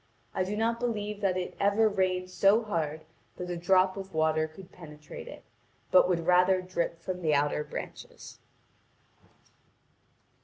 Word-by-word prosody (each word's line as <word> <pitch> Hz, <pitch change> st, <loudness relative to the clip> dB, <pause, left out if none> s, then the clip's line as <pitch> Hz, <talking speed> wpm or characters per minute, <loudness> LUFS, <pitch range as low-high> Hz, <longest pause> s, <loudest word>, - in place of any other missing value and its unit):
I 185 Hz, -, 0 dB
do 200 Hz, +3 st, -3 dB
not 230 Hz, +1 st, 0 dB
believe 210 Hz, -3 st, -3 dB
that 190 Hz, -2 st, +1 dB
it 180 Hz, -, -4 dB
ever 205 Hz, +2 st, +3 dB
rained 185 Hz, -2 st, 0 dB
so 200 Hz, +5 st, +4 dB
hard 160 Hz, -7 st, -3 dB, 0.3 s
that 180 Hz, 0 st, -5 dB
a -, -, -2 dB
drop 185 Hz, +2 st, +3 dB
of 195 Hz, -3 st, -8 dB
water 155 Hz, 0 st, +2 dB
could 180 Hz, +4 st, -14 dB
penetrate 150 Hz, -3 st, -11 dB
it, -, -, -10 dB, 0.5 s
but 185 Hz, 0 st, +6 dB
would 170 Hz, -2 st, 0 dB
rather 180 Hz, +1 st, +4 dB
drip 180 Hz, -2 st, -3 dB
from 180 Hz, +1 st, -5 dB
the 155 Hz, -3 st, +2 dB
outer 145 Hz, +1 st, +1 dB
branches. 150 Hz, -, -9 dB
185 Hz, 150 wpm, -29 LUFS, 165-195 Hz, 0.5 s, but